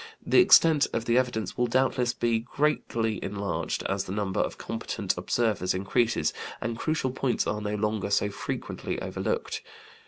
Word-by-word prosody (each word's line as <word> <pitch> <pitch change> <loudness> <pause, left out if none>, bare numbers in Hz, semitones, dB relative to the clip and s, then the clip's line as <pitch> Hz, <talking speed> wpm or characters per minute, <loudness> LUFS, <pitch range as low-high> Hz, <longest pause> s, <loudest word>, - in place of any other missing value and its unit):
The - - +5
extent 165 - +6
of 115 0 -1
the 115 - +2
evidence 120 -5 0
will 125 - +3
doubtless 125 0 +2
be 120 -2 0
greatly 115 -4 -1
enlarged 100 0 -2
as 95 0 -1
the - - -6
number 100 -2 -1
of - - -1
competent - - -3
observers 110 -6 0
increases, 100 -1 +1 0.3
and 115 0 -3
crucial 155 0 -1
points 130 -1 0
are 105 0 -2
no 105 0 -2
longer 105 -1 -1
so 100 0 +2
frequently 100 - -4
overlooked. - - -3
115 Hz, 155 wpm, -27 LUFS, 105-125 Hz, 0.3 s, extent